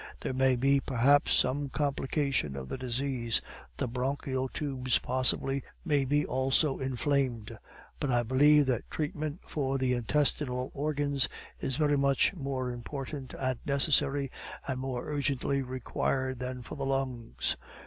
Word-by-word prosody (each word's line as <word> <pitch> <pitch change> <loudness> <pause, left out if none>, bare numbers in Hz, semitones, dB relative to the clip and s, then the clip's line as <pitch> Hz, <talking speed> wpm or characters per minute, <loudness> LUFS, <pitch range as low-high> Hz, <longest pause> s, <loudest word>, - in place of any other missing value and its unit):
There - - -2
may 130 0 +3
be, 135 +3 +3
perhaps, 135 +2 +3
some 140 +2 +1
complication 140 - 0
of 65 -1 -6
the - - -3
disease 125 -2 0 0.4
the - - -1
bronchial 130 +1 -2
tubes, 130 -4 0
possibly, 130 +2 +1 0.2
may 145 -5 +2
be 145 +2 +2
also 135 +2 +2
inflamed; 130 -3 -1 0.4
but 145 - -1
I 120 -1 +3
believe 145 +5 +5
that 125 -4 -1
treatment 155 +1 -3
for 135 -2 -1
the 130 -1 +1
intestinal 125 +1 0
organs 145 -2 0 0.3
is 130 - -1
very 145 -1 +2
much 140 +5 +3
more 135 -6 -3
important 135 +2 -6
and 130 -2 -1
necessary, 140 -1 +2 0.4
and 130 -2 -2
more 130 -2 -3
urgently 140 -2 0
required 130 0 -2
than 125 0 -4
for - - -9
the 140 - -4
lungs. 130 -4 -1
135 Hz, 140 wpm, -30 LUFS, 125-140 Hz, 0.4 s, believe